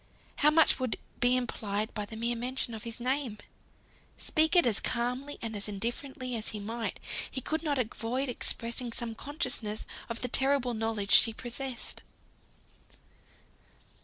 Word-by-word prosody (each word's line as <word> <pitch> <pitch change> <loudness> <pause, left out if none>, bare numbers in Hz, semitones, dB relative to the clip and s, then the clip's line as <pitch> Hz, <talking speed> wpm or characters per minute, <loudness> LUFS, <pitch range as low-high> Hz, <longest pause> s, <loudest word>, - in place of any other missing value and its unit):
How 300 - +6
much 315 -1 +5
would 255 -3 -1 0.2
be 250 +1 +4
implied 215 -3 -2
by 210 -2 -3
the 220 - -8
mere 235 +2 0
mention 245 0 -1
of 220 +1 -6
his 230 0 -2
name! 255 -2 -1 0.8
Speak 315 +2 +3
it 350 - +7
as 230 -4 +3
calmly, 250 +4 -1
and 225 -1 -3
as 200 0 -2
indifferently 245 +5 -3
as 220 -1 -2
he 215 - -2
might, 225 +3 -3 0.3
he - - -3
could 315 +5 -2
not 295 -4 0
avoid 250 +2 -1
expressing 235 0 0
some 235 -1 -2
consciousness 230 -5 -2 0.2
of 230 - -4
the 250 - 0
terrible 265 0 +3
knowledge 220 -3 -1
she 225 0 +8
possessed. 245 +2 -5
240 Hz, 150 wpm, -30 LUFS, 225-260 Hz, 0.8 s, she